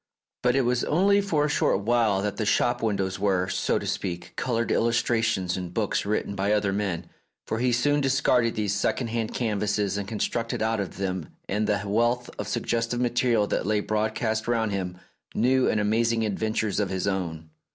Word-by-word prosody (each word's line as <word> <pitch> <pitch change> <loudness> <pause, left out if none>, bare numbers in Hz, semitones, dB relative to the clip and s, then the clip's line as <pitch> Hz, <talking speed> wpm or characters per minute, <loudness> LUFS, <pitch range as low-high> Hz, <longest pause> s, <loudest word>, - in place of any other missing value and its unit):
But 125 0 +2
it 135 - +4
was 125 -1 +1
only 200 +5 +3
for 160 -7 +1
a - - +1
short 145 -8 +1
while 110 -3 +2
that 105 - -2
the 110 - -1
shop 120 +3 +2
windows 95 -4 -1
were, 95 -2 +1
so - - 0
to - - -4
speak, 90 -2 -4
coloured 115 -2 -1
illustrations 115 -5 +1
in 90 -2 -4
books - - -1
written 105 -1 -1
by 100 +1 +1
other 100 -2 +1
men, 95 -4 -2 0.4
for 110 - -2
he 125 +1 +2
soon 145 +5 +2
discarded 130 -3 +2
these 105 -3 0
second 115 +4 0
hand 115 0 -2
canvases, 105 -4 0
and 100 - -5
constructed 115 +1 -2
out 110 0 0
of 100 - -4
them 95 -4 -3 0.2
and 105 +2 0
the 105 -2 0
wealth 120 +4 +1
of - - -3
suggestive 115 +1 -1
material 120 -3 +2
that 100 - -2
lay 105 0 +2
broadcast 110 +1 -1
round 115 -3 +1
him 90 -2 -3 0.4
new 130 +3 +3
and 110 - +1
amazing 115 +2 +1
adventures 110 0 -1
of 100 -3 0
his 95 -1 -2
own. 85 -5 -3
110 Hz, 185 wpm, -26 LUFS, 100-120 Hz, 0.4 s, it